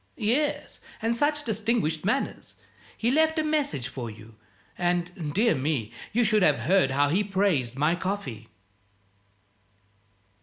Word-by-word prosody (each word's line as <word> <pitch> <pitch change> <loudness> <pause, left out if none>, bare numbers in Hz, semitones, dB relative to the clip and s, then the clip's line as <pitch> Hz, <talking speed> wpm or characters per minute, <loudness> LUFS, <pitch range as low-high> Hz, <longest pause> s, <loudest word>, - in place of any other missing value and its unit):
"Yes, 260 +7 -1 0.2
and 230 +1 0
such 295 +4 +1
distinguished 215 - 0
manners! 255 +8 -2 0.4
He 235 +2 +1
left 315 +3 +3
a 315 - +2
message 290 - -1
for 125 -2 -6
you 110 +1 -13 0.4
and, 175 -2 -1
dear 225 +3 +4
me, 130 -5 -2 0.2
you 240 +3 +2
should 215 -1 +3
have 150 -9 +3
heard 175 +2 +3
how 140 +2 +2
he 190 +7 +2
praised 190 - 0
my 150 +4 +2
coffee!" 175 - -4
185 Hz, 130 wpm, -26 LUFS, 140-230 Hz, 0.4 s, dear